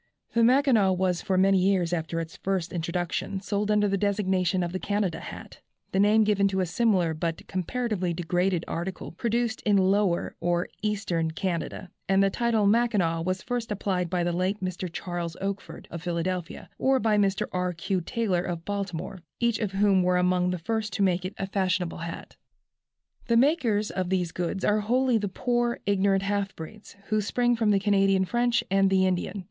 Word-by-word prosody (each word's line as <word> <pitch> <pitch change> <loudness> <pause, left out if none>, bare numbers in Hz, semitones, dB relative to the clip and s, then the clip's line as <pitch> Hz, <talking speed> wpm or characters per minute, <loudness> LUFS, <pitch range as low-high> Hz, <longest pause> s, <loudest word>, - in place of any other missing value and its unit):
The 230 - +3
Mackinaw 240 -6 +4
was 180 -1 0
for 190 -2 0
many 195 0 +4
years 180 -2 +2
after 165 0 -2
its 165 -1 -6
first 190 -3 -2
introduction 175 +3 -2
sold 205 +1 -2
under 210 -1 +3
the 195 -1 0
designation 190 -3 +1
of 170 - -3
the 185 - -3
"Canada" 200 -5 -1
hat, - - -10 0.3
the 190 - 0
name 210 +2 +5
given 205 -2 +3
to 190 -1 -1
a 185 - +2
similar 180 -2 +1
but 165 +1 -3
comparatively 190 -1 -2
degraded 175 +1 0
article 180 +3 -4
produced 230 +4 -1
in 205 -2 +3
Lower, 190 -1 +1
or 175 +1 0
Eastern 200 -6 -1
Canada; 175 +2 -4 0.2
and 195 0 +4
the 195 - +2
title 235 -2 +1
Mackinaw 200 -7 +2
was 185 +2 -2
first 240 -3 -3
applied 185 -3 -1
by 180 0 0
the 175 - 0
late 185 +4 -1
Mr. 185 -2 -4
Charles 175 -1 -4
Oakford, 195 0 -5
of 170 - -6
Philadelphia, 175 0 -3
or 265 0 +3
by 220 -3 +2
Mr. 200 -2 +2
R. 180 0 -1
Q. 180 +2 -2
Taylor, 200 -2 -1
of 170 -2 -5
Baltimore, 195 -2 -4 0.2
each 235 -2 +1
of 205 -4 -2
whom 195 -1 +3
were 180 0 +2
among 180 0 +2
the 180 - -1
first 215 +5 -3
to 200 - +1
make 180 -1 +1
it 185 - -5
a 195 - -2
fashionable 185 -3 -1
hat. 170 0 -7 0.9
The 235 -2 +3
makers 235 -7 +2
of 185 -2 -2
these 180 -3 0
goods 180 +3 -2
are 210 +1 +3
wholly 245 +2 +2
the 205 - -2
poor, 240 +3 0
ignorant 195 -1 +2
half 200 0 -1
breeds, 205 +8 -10
who 215 -1 +2
spring 240 +3 +1
from 225 -2 +1
the 200 -1 +4
Canadian 195 -1 +3
French 240 +3 +1
and 195 0 +4
the 190 0 +3
Indian. 185 +2 -1
195 Hz, 185 wpm, -27 LUFS, 180-210 Hz, 0.9 s, name